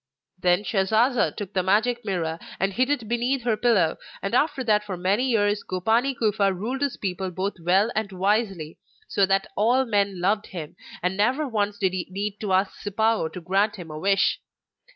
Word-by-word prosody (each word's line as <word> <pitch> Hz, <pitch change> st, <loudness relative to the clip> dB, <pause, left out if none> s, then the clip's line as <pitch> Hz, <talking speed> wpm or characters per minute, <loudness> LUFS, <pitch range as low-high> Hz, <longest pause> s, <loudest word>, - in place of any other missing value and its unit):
Then 180 Hz, +2 st, +2 dB
Shasasa 215 Hz, -, +2 dB
took 205 Hz, -3 st, -6 dB
the 185 Hz, -, +2 dB
Magic 220 Hz, +6 st, +1 dB
Mirror 170 Hz, -5 st, -2 dB, 0.2 s
and 195 Hz, +1 st, 0 dB
hid 255 Hz, +5 st, +1 dB
it 280 Hz, -7 st, -1 dB
beneath 240 Hz, +3 st, 0 dB
her 235 Hz, -2 st, +1 dB
pillow, 210 Hz, -7 st, +2 dB, 0.3 s
and 195 Hz, -, -3 dB
after 285 Hz, +1 st, +2 dB
that 210 Hz, -3 st, +2 dB
for 195 Hz, -3 st, -5 dB
many 200 Hz, +9 st, +1 dB
years 205 Hz, -3 st, +1 dB
Gopani 225 Hz, +9 st, +1 dB
Kufa 205 Hz, -3 st, +2 dB
ruled 225 Hz, +9 st, -4 dB
his 280 Hz, -2 st, -1 dB
people 190 Hz, -1 st, -3 dB
both 190 Hz, +3 st, -3 dB
well 190 Hz, +7 st, +3 dB
and 215 Hz, -2 st, -1 dB
wisely, 195 Hz, -4 st, -1 dB, 0.3 s
so 195 Hz, -1 st, +2 dB
that 195 Hz, 0 st, +2 dB
all 245 Hz, +5 st, +3 dB
men 200 Hz, -4 st, 0 dB
loved 205 Hz, +4 st, +1 dB
him, 165 Hz, -6 st, -7 dB, 0.3 s
and 180 Hz, +1 st, 0 dB
never 255 Hz, +9 st, +1 dB
once 205 Hz, -4 st, -1 dB
did 190 Hz, -2 st, 0 dB
he 185 Hz, -1 st, -3 dB
need 200 Hz, +2 st, -4 dB
to 205 Hz, -3 st, -3 dB
ask 190 Hz, +1 st, +1 dB
Sipao 215 Hz, -3 st, 0 dB
to 180 Hz, -, -8 dB
grant 195 Hz, +4 st, +1 dB
him 175 Hz, -5 st, -9 dB
a 155 Hz, -, -6 dB
wish. 195 Hz, +2 st, +2 dB
205 Hz, 190 wpm, -25 LUFS, 185-225 Hz, 0.3 s, well